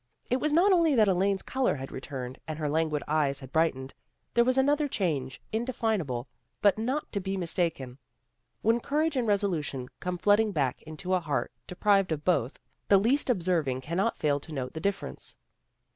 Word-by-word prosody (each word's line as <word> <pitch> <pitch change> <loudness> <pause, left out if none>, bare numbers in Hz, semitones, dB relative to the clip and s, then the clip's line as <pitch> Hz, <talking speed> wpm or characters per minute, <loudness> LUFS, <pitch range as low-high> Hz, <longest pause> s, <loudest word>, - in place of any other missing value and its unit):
It 250 - +2
was 305 - 0
not 350 +6 +5
only 330 -5 +4
that 215 -3 +5
Elaine's 195 +1 +1
color 260 - 0
had 135 -1 -7
returned, 130 -1 -6
and 155 -1 -4
her 155 -2 -2
languid 155 0 0
eyes 145 -3 +1
had 130 -1 -11
brightened. 140 -5 0 0.4
There 235 - +5
was 255 +2 +2
another 290 +2 +3
change, 150 - -2
indefinable, 220 - -1 0.3
but 205 +1 +3
not 260 +7 -2
to 200 - -1
be 195 0 -3
mis 175 -3 -1
taken. 140 -8 -2 0.6
When 230 +2 +3
courage 300 +4 0
and 245 -3 0
resolution 170 -11 -1
come 180 0 -3
flooding 205 +3 +3
back 135 -6 0
into 155 +4 -5
a 185 - +4
heart 155 -4 -2 0.2
deprived 195 0 +2
of 150 -1 -3
both 150 -8 +1 0.3
the 200 - +6
least 250 +9 +2
observing 170 - +1
cannot 175 - -1
fail 145 -1 +1
to 160 - -10
note 130 -4 -4
the 160 - -5
difference. 200 +3 -4
180 Hz, 180 wpm, -28 LUFS, 145-225 Hz, 0.6 s, the